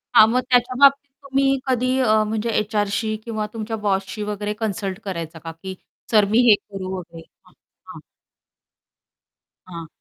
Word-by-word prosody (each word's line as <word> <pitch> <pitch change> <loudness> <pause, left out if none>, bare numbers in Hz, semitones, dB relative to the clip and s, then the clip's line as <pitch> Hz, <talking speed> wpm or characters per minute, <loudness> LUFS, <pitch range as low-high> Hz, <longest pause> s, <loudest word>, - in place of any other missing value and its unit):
हां, 220 -2 +9
मग 250 +2 +2
त्याच्याबाबतीत 260 +3 +4
तुम्ही 275 0 +1
कधी 255 0 +1
अ, 215 -4 +3
म्हणजे 220 +1 -2
एचआरशी 215 +1 -1
किंवा 220 -2 -3
तुमच्या 225 0 -4
बॉसशी 195 +2 -1
वगैरे 210 0 -3
कन्सल्ट 210 -3 -3
करायचा 165 -4 -5
का, 165 +1 -7
की 185 +4 -8 0.4
"सर 210 -3 +5
मी 225 - +4
हे 210 - +8
करू 195 -2 -7
वगैरे 170 -2 -10
हां, - - -24 0.3
हां." - - -11 1.7
हां. 170 -2 -8
215 Hz, 145 wpm, -22 LUFS, 195-235 Hz, 1.7 s, हां